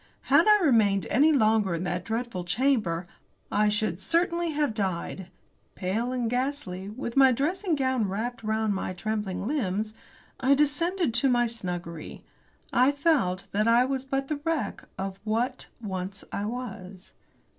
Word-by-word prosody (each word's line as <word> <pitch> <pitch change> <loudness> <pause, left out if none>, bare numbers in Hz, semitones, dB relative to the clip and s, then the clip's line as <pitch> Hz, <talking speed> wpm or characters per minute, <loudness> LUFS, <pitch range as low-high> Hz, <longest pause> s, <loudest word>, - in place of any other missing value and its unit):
Had 320 +7 +6
I 420 0 +7
remained 205 - +3
any 295 +5 +5
longer 215 - +3
in 165 - -3
that 180 0 -2
dreadful 225 -4 -3
chamber 190 -4 +1 0.5
I 210 0 +3
should 210 -4 -1
certainly 340 - +1
have 295 -5 0
died. 190 -2 -3 0.5
Pale 220 +7 -1
and 250 -2 -1
ghastly, 245 -7 -2
with 235 +2 -6
my 270 -1 +7
dressing 335 - 0
gown 260 -6 +1
wrapped 230 +5 -3
round 220 -1 0
my 190 -1 -3
trembling 200 0 -3
limbs, 215 -5 -1 0.5
I 270 +1 +4
descended 300 +1 +1
to 240 +4 +3
my 240 -1 +3
snuggery. 175 -8 -6 0.5
I 255 +3 +5
felt 280 - +1
that 210 +2 +1
I 235 +2 +5
was 265 0 -2
but 270 0 -2
the 300 - -2
wreck 315 -10 -2
of 190 0 -4
what 235 +4 -1
once 195 -2 -5
I 200 - -2
was. 210 -6 -7
230 Hz, 150 wpm, -27 LUFS, 195-270 Hz, 0.5 s, I